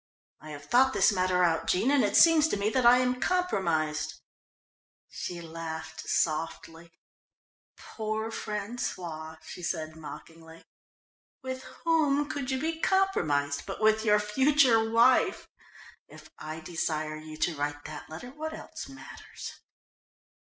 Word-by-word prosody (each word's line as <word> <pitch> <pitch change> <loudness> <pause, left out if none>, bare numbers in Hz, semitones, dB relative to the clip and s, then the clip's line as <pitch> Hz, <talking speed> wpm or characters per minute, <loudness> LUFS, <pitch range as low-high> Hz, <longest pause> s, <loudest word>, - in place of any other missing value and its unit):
I 155 - -12
have 145 -1 -9
thought 260 - +4
this - - +4
matter 185 -2 +1
out, 165 -2 +1
Jean, 210 +9 +2
and 285 -2 +4
it - - 0
seems 325 -2 +7
to 260 - -1
me 205 +2 0
that 255 -1 +3
I 245 +1 +8
am 250 0 +1
compromised." 170 - 0 0.9
She 175 - -6
laughed 160 -1 -7
softly. 165 +1 -2 0.8
"Poor 220 0 -4
François," 185 -8 -5
she 160 - -9
said 160 -2 -3
mockingly. 160 +1 -11 0.8
"With 260 0 -4 0.2
whom 295 -3 +2
could 285 -4 -4
you 265 -1 0
be 320 +3 -2
compromised 155 - +1
but 195 - -5
with 220 0 +3
your 210 -1 +4
future 235 +1 +3
wife? 235 +3 +3 0.6
If - - -15
I 155 +1 -6
desire 155 -2 -3
you 155 0 -10
to 165 +1 0
write 145 0 -3
that 155 -1 -8
letter, 170 +11 -8
what 315 +3 -6
else - - -9
matters?" 275 +1 -10
200 Hz, 135 wpm, -28 LUFS, 160-260 Hz, 0.9 s, I